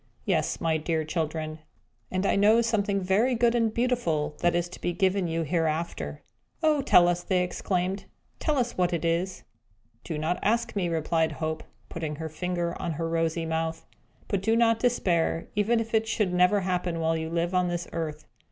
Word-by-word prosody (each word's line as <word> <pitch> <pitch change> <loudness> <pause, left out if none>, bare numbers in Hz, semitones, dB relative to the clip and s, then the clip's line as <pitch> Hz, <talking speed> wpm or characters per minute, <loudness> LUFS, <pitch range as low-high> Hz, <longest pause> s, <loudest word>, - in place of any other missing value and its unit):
Yes, - - 0
my 160 -1 +1
dear 160 0 -1
children, 155 -1 -3 0.5
and 185 +1 -1
I - - +3
know 210 +3 +5
something 205 -3 0
very 210 +7 +2
good 235 0 +3
and 230 -2 +2
beautiful 220 -12 0
that 175 0 +2
is 175 0 +1
to 180 - -11
be 175 - -1
given 190 0 +1
you 165 0 -1
hereafter!" 165 +1 -2 0.4
"Oh 305 -2 +4
tell 175 -10 +6
us," 175 0 +1
they 180 0 +1
exclaimed 185 +1 -2 0.3
"tell 305 -3 0
us 240 -2 0
what 180 -1 +1
it 170 -1 -1
is!" 170 +3 -1 0.6
"Do 160 - -4
not 160 +4 -1
ask 230 +2 0
me," 180 -4 0
replied 160 0 +1
Hope, 155 +2 -3 0.3
putting 160 -2 -4
her 160 +1 -5
finger 175 +1 -2
on 170 - -2
her 165 +2 -2
rosy 165 0 0
mouth. 160 0 -2 0.4
"But 200 - -1
do 225 +3 +2
not 230 -1 +3
despair, 175 -9 +1
even 215 +3 +2
if 225 0 -4
it 220 0 +2
should 210 -4 0
never 180 +3 +4
happen 180 -2 -1
while 165 0 +1
you 160 0 -3
live 170 +2 -1
on 180 -1 +2
this 175 0 -3
earth. 155 -2 -4
175 Hz, 190 wpm, -27 LUFS, 165-205 Hz, 0.6 s, tell